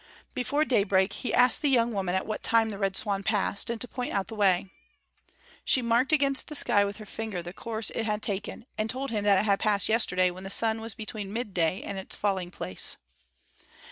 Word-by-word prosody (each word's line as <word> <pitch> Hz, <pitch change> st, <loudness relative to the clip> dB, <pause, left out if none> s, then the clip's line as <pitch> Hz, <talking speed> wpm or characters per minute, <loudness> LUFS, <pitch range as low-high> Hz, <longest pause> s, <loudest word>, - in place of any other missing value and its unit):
Before 285 Hz, +5 st, 0 dB
daybreak 200 Hz, -5 st, +2 dB
he 255 Hz, -, -4 dB
asked 250 Hz, -1 st, +5 dB
the 295 Hz, -, +2 dB
young 240 Hz, -3 st, +3 dB
woman 190 Hz, -3 st, -1 dB
at 190 Hz, -, -1 dB
what 215 Hz, -, -4 dB
time 225 Hz, -1 st, +2 dB
the 200 Hz, -, -7 dB
Red 195 Hz, -1 st, 0 dB
Swan 200 Hz, -2 st, -1 dB
passed, 200 Hz, 0 st, +1 dB
and 235 Hz, -1 st, -3 dB
to 245 Hz, -, -3 dB
point 250 Hz, 0 st, -5 dB
out 195 Hz, +1 st, -1 dB
the -, -, -7 dB
way. 195 Hz, -2 st, +2 dB, 0.9 s
She 260 Hz, -, +2 dB
marked 235 Hz, +5 st, +2 dB
against 275 Hz, -3 st, +1 dB
the 300 Hz, -, -5 dB
sky 235 Hz, -7 st, +4 dB
with 200 Hz, 0 st, -4 dB
her 215 Hz, -, -9 dB
finger 210 Hz, -5 st, -5 dB
the 175 Hz, +1 st, -8 dB
course 220 Hz, +1 st, -3 dB
it 225 Hz, -, -2 dB
had 210 Hz, 0 st, -2 dB
taken, 205 Hz, +2 st, -4 dB
and 215 Hz, +1 st, 0 dB
told 265 Hz, +2 st, -3 dB
him 210 Hz, -3 st, -1 dB
that 200 Hz, -2 st, +5 dB
it 210 Hz, -, +1 dB
had 200 Hz, -2 st, +2 dB
passed 205 Hz, -3 st, +2 dB
yesterday 185 Hz, -5 st, +3 dB
when 185 Hz, +1 st, -10 dB
the 195 Hz, -, -6 dB
sun 220 Hz, +2 st, +3 dB
was 225 Hz, -1 st, -3 dB
between 215 Hz, -2 st, -6 dB
midday 190 Hz, -6 st, -1 dB
and 200 Hz, -1 st, -5 dB
its 190 Hz, -, -5 dB
falling 190 Hz, -3 st, -1 dB
place. 95 Hz, -, -3 dB
210 Hz, 220 wpm, -27 LUFS, 195-230 Hz, 0.9 s, asked